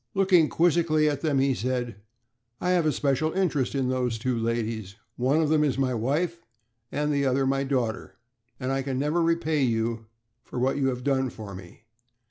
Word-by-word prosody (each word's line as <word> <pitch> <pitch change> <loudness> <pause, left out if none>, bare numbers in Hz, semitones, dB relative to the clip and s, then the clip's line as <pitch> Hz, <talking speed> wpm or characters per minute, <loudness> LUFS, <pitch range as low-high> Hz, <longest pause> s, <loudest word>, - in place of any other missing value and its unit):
Looking 185 -5 +4
quizzically 165 -2 +2
at 145 -2 -1
them, 150 -4 +1
he 135 0 +3
said: 120 -3 -2 0.6
"I 180 - 0
have 175 -3 +2
a - - +3
special 145 +2 0
interest 155 -9 0
in 135 -2 0
those 125 -3 -1
two 125 +2 -1
ladies. 115 -3 -2 0.2
One 135 +6 +2
of 150 - 0
them 155 -1 +3
is 140 -4 0
my 130 -2 +1
wife, 155 +9 -1 0.5
and 150 0 0
the 140 -1 +1
other 135 +1 +1
my 135 +1 +1
daughter, 125 -5 -2 0.4
and 130 0 -2
I 135 0 0
can 135 -1 -3
never 150 +5 +1
repay 165 -2 +1
you 115 -2 -1 0.4
for - - -9
what 130 +3 +1
you 135 -2 +1
have 125 -1 -2
done 135 -1 +1
for 105 -4 -9
me. 95 +3 -12
135 Hz, 190 wpm, -26 LUFS, 125-155 Hz, 0.6 s, Looking